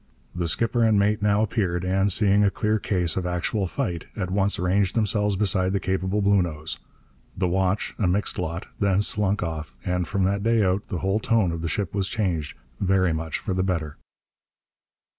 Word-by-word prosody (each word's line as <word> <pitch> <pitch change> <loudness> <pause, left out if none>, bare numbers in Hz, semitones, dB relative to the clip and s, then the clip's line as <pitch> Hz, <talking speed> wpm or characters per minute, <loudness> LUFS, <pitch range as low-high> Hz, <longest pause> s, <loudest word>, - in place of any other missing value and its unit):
The 85 -1 -2
skipper 115 +7 +1
and 110 -2 +4
mate 105 +1 +2
now 105 +1 +3
appeared, 95 -5 -1
and, 95 +2 +2
seeing 100 +1 +3
a 100 - +4
clear 105 +2 0
case 90 -5 0
of 90 -2 -1
actual 90 +3 -1
fight, 85 -1 -3
at 95 -4 -3
once 100 +1 +1
ranged 95 +1 +1
themselves 105 -2 +1
beside 95 -2 +1
the 100 - +1
capable 95 +2 -1
Bluenose. 90 -6 0 0.6
The 90 -1 +1
watch, 95 +2 0
a 100 - +2
mixed 95 +2 0
lot, 85 0 -3
then 100 0 +2
slunk 105 -1 0
off; 80 -6 -5
and, 90 -1 -1
from 100 +2 0
that 100 +2 +1
day 115 0 +2
out, 95 +2 0
the 90 - -4
whole 95 +3 +2
tone 110 -5 +2
of 85 0 -4
the 85 - -2
ship 95 +1 -2
was 100 -1 0
changed, 90 -8 -2 0.2
very 95 -3 +2
much 80 0 -3
for 95 - -3
the 90 - 0
better. 85 -6 -2
95 Hz, 190 wpm, -24 LUFS, 90-105 Hz, 0.6 s, and